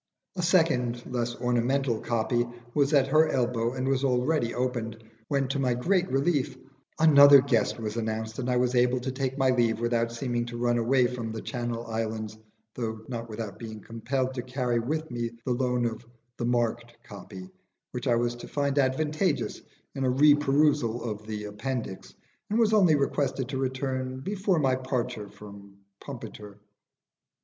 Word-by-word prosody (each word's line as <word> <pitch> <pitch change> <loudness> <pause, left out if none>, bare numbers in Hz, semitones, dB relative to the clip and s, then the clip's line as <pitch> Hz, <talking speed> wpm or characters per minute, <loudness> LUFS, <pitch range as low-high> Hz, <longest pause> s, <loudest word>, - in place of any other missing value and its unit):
A 180 - -2
second 160 -9 +2
(less 120 -1 -2
ornamental) 125 0 0
copy 120 +1 0 0.3
was 145 -1 +2
at 140 -3 +5
her 155 +2 +4
elbow 120 -2 0
and 130 0 -2
was 135 0 +1
already 125 0 +1
opened, 120 -3 -2 0.3
when 140 -1 0
to 140 - -1
my 125 -3 +1
great 180 +8 +1
relief 140 +1 +1 0.4
another 145 -3 +9
guest 130 -4 +1
was 110 0 -4
announced, 110 0 -3
and 130 -1 -2
I 125 - +2
was 125 0 +1
able 125 +1 +3
to 130 +1 -3
take 135 0 -3
my 135 -2 +3
leave 115 -3 +2
without 115 0 0
seeming 120 0 -2
to 120 0 -6
run 120 0 +1
away 125 +2 +3
from 120 -2 -3
'The 110 - -6
Channel 120 -2 -4
Islands,' 110 -1 -3 0.4
though 110 -2 -4
not 115 -2 -5
without 110 -1 -6
being 110 -2 -7
compelled 130 +5 -2
to 125 - -3
carry 125 -1 -1
with 155 +6 -3
me 120 -1 -2 0.2
the 130 - -1
loan 125 -1 0
of 115 -1 -3 0.3
"the 120 - -2
marked 120 -1 -1
copy," 95 -2 -10 0.4
which 125 +2 -4
I 120 - +4
was 120 0 0
to - - -9
find 140 -1 0
advantageous 150 - 0 0.3
in 135 - -3
a 130 - +2
re 145 +4 +6
perusal 145 -4 +2
of 105 0 -8
the 105 -1 -4
appendix, 105 0 -5 0.4
and 215 - +1
was 220 -2 +3
only 185 -7 +5
requested 140 -2 -1
to 135 -2 -3
return 130 0 -2
before 195 +2 0
my 135 -4 +2
departure 130 -5 -3
from 100 -1 -13 0.2
Pumpiter. 105 -6 -9
125 Hz, 170 wpm, -27 LUFS, 115-135 Hz, 0.4 s, another